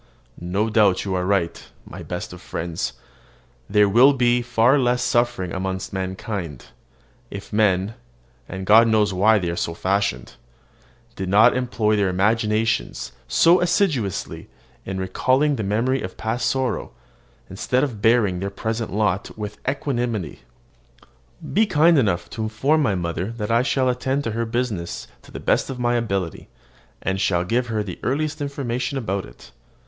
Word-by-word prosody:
No 95 +5 -1
doubt 105 -4 +3
you 95 - -2
are 90 0 -1
right, 90 -4 0 0.2
my - - -9
best - - -6
of - - -11
friends, 85 -1 -4 0.8
there 105 0 +4
would 130 +7 +5
be 120 0 +3
far 120 +3 +3
less 125 -1 +1
suffering 120 -7 0
amongst 95 0 -4
mankind, 95 - -4 0.6
if 100 0 -9
men 100 -1 +2 0.6
and 95 0 -5
God 110 +3 +7
knows 105 -3 +2
why 105 +4 +4
they 90 -4 -1
are - - -4
so 85 -1 -3
fashioned 95 -10 -1 0.8
did 95 -1 -4
not 105 +3 +5
employ 120 -4 0
their 100 -2 +1
imaginations 105 - 0 0.2
so 175 +2 +5
assiduously 170 - -1 0.4
in 95 0 -4
recalling 130 +10 +1
the 115 - -3
memory 115 +6 0
of 90 - -7
past 110 +3 -1
sorrow, 130 - -2 0.5
instead 125 +7 -1
of 120 -8 -3
bearing 110 -5 +3
their 100 +2 -3
present 110 +3 -3
lot 100 -1 -1
with 105 -1 -6
equanimity. 120 - -2 1.1
Be 215 +2 +3
kind 165 -2 +4
enough 90 -8 0
to 110 - -5
inform 125 +9 +1
my 110 -9 +1
mother 85 +2 -3
that 110 -1 -4
I 115 +1 +4
shall 130 0 +1
attend 130 +3 0
to 115 - -2
her 115 +2 -2
business 115 -7 -3
to - - -17
the - - -7
best - - +1
of 135 - -5
my 120 -1 +1
ability, 100 -8 -2 0.5
and 95 0 -1
shall 90 -4 +1
give 120 +6 0
her 110 -2 -1
the 95 -4 -7
earliest 155 +3 -2
information 140 -1 -3
about 100 -6 -2
it. - - -16
110 Hz, 155 wpm, -22 LUFS, 95-125 Hz, 1.1 s, God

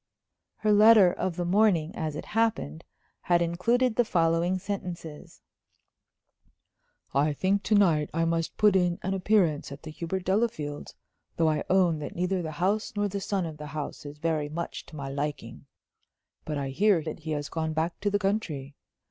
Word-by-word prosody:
Her 215 -1 0
letter 210 -3 +7
of 185 -3 -2
the 175 0 -2
morning, 180 -4 +2
as 155 -3 -3
it - - -6
happened, 210 - -1 0.4
had 175 0 +2
included 220 +9 +1
the 240 - +5
following 170 -2 +1
sentences: 180 -5 -7 1.7
"I 145 +2 +2
think 190 +6 +1
to 210 +2 +1
night 165 -7 +3
I 165 +1 0
must 165 0 -1
put 210 -2 +4
in 175 -2 +2
an 190 - -1
appearance 185 -7 +1
at 140 - -9
the 155 - -7
Hubert 175 +4 -4
Delafields', 190 -8 -1 0.4
though 165 -1 +3
I 155 - -1
own 180 -4 +3
that 150 - -6
neither 180 +1 0
the 160 -2 -5
house 195 +7 0
nor 205 0 0
the 200 +1 -4
son 195 -2 -1
of 160 -2 -7
the 150 0 -8
house 150 0 -6
is 145 0 -9
very 155 -1 -1
much 170 +3 -5
to 160 - -12
my 140 -2 -5
liking. 140 -3 -5 0.8
But 150 -1 -3
I 140 -1 -3
hear 190 +4 +2
that 155 - -6
he 160 - -8
has 145 0 -3
gone 160 0 -3
back 160 +2 -2
to 205 - 0
the 205 - +1
country. 190 -9 -2
170 Hz, 180 wpm, -27 LUFS, 150-195 Hz, 1.7 s, letter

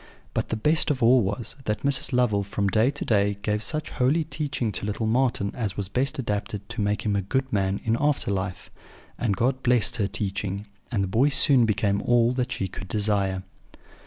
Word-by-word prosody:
But - - -2
the - - -1
best 150 +8 +3
of 135 -5 0
all 125 +2 +6
was, 105 +3 -3
that 105 0 -2
Mrs. 140 -1 +1
Lovel 120 -5 +2
from 100 0 -2
day 110 +5 +3
to 145 +1 -4
day 100 -2 +2
gave 105 +1 0
such 155 +6 -3
holy 140 +6 +2
teaching 145 -7 -2
to 100 - -4
little 105 +2 -2
Marten 115 -3 +1
as 110 -6 -3
was 100 -2 -3
best 130 +5 0
adapted 105 -4 -3
to - - -3
make 105 0 0
him 105 -1 +1
a 100 - +1
good 130 +7 -2
man 95 -1 +1
in 110 0 +1
after 145 -7 +1
life; 95 -2 -4 0.5
and 105 -6 0
God 130 +4 +1
blessed 125 -1 +2
her 100 -4 +1
teaching, 100 -1 -3 0.3
and 105 -5 0
the - - -1
boy 115 +9 +3
soon 130 -3 +4
became 100 -1 +1
all 120 0 +3
that 125 0 -2
she 95 - -2
could 95 +1 -8
desire. 100 -2 0
110 Hz, 205 wpm, -25 LUFS, 100-125 Hz, 0.5 s, all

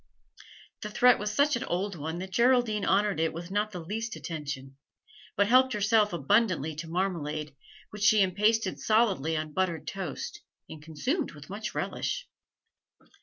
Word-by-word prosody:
The 210 - -5
threat 250 +3 +5
was 210 0 -2
such 285 +6 +3
an 235 - -2
old 195 +3 -2
one 160 0 -5
that 190 +1 -6
Geraldine 235 -1 +3
honoured 200 -2 +2
it 160 0 +1
with 170 +2 -7
not 210 +1 0
the 185 -4 -7
least 220 +7 -4
attention, 145 -5 -6 0.6
but 200 - +3
helped 255 +3 +5
herself 210 0 +3
abundantly 165 - +1
to 165 +1 -5
marmalade, 155 -5 -2 0.4
which 210 - -9
she 215 -1 +5
impasted 210 +4 +1
solidly 195 - +2
on 155 -1 -4
buttered 170 -4 -1
toast, 185 -8 -5 0.3
and 155 - -10
consumed 250 - -2
with 150 +3 -12
much 210 +2 -5
relish. - - -3
195 Hz, 155 wpm, -28 LUFS, 160-215 Hz, 0.6 s, threat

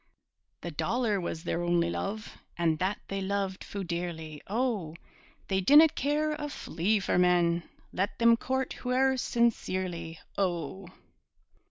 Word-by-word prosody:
The 175 - -5
dollar 215 - 0
was 165 -1 -4
their 170 - -1
only 175 -1 +2
love, 210 +4 -4 0.2
And 165 -2 +1
that 190 +3 0
they 195 0 -3
loved 195 0 -2
fu' 200 -1 -5
dearly, 170 -3 -4
O! 210 -8 -1 0.5
They 190 -1 +1
dinna 295 - +8
care 295 +2 0
a 295 -1 -4
flea 205 - 0
for 190 -2 +1
men, 175 -1 +3 0.2
Let 195 +3 -1
them 235 0 +6
court 260 +2 -2
hooe'er 260 +1 +2
sincerely, 185 -9 -1 0.2
O! 180 0 -2
190 Hz, 135 wpm, -29 LUFS, 170-235 Hz, 0.5 s, dinna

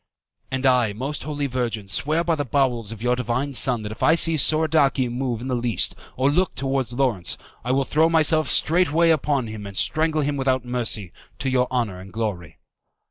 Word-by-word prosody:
"And 130 0 -3
I, 125 -5 +3
Most 135 +6 -5
Holy 145 -1 -3
Virgin, 120 -6 -3
swear 155 - 0
by 170 0 0
the 145 -2 -1
bowels 125 -5 -1
of 115 0 -9
your 125 0 +2
Divine 125 +3 -2
Son 125 -3 +2
that 105 - -6
if 110 - -10
I 160 - +4
see 165 0 +5
Soradici 155 -4 +3
move 120 -1 -3
in 130 - -6
the 130 - -2
least 120 -2 +1 0.2
or 135 +2 +2
look 180 +4 0
towards 135 -3 -2
Lawrence, 120 -9 0 0.3
I 125 - -2
will 135 +1 +2
throw 160 +4 +2
myself 155 -2 +3
straightway 165 0 +3
upon 145 -4 0
him 110 -2 -7
and 100 -1 -8
strangle 155 0 +1
him 145 0 -1
without 130 -2 0
mercy, 115 -6 -1 0.3
to 135 - -3
your 125 -1 +2
honour 115 -8 -2
and 95 +1 -12
glory." 105 -8 -4
130 Hz, 195 wpm, -22 LUFS, 115-145 Hz, 0.3 s, see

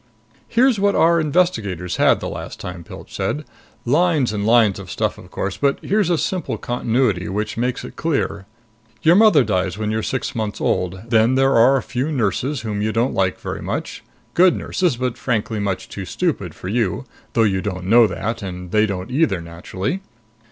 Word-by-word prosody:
"Here's 240 -1 +3
what 200 0 +2
our 170 +1 +4
investigators 110 - 0
had - - +4
the - - -4
last - - -7
time," 90 -1 -7
Pilch - - -11
said. 150 0 -2 0.4
"Lines 150 -3 +2
and 105 0 -1
lines 115 -4 +4
of - - -9
stuff, - - -2
of - - -14
course. 100 -1 -3
But 140 -1 +1
here's 205 -3 +1
a 170 - +2
simple 170 - -2
continuity 120 -5 0
which 105 +3 -2
makes 125 +2 -2
it - - -10
clear. 135 - -1 0.6
Your 165 - +6
mother 205 - +6
dies 95 -3 -1
when 105 0 -2
you're 110 0 0
six 130 +3 -3
months 110 -3 -3
old. 90 +1 -1
Then 115 +2 +3
there 135 +1 +3
are 125 +4 +6
a 130 - -3
few 130 +5 -2
nurses 130 +2 -1
whom 105 -2 -3
you 110 +1 0
don't 115 +4 0
like 95 -1 0
very - - -5
much. - - -4 0.3
Good 180 +1 +5
nurses 175 -10 -1
but 125 -1 -2
frankly 110 -3 -1
much 100 -2 -2
too 95 - -7
stupid 100 - -2
for - - -8
you, 105 -2 -1 0.3
though 115 - +3
you 95 -3 +1
don't 90 -3 -4
know 115 +3 +6
that, 115 +3 -3
and 90 -2 -7
they 110 +1 +3
don't 95 0 -5
either, 125 - +2
naturally. 90 - -4
115 Hz, 190 wpm, -20 LUFS, 100-140 Hz, 0.6 s, Your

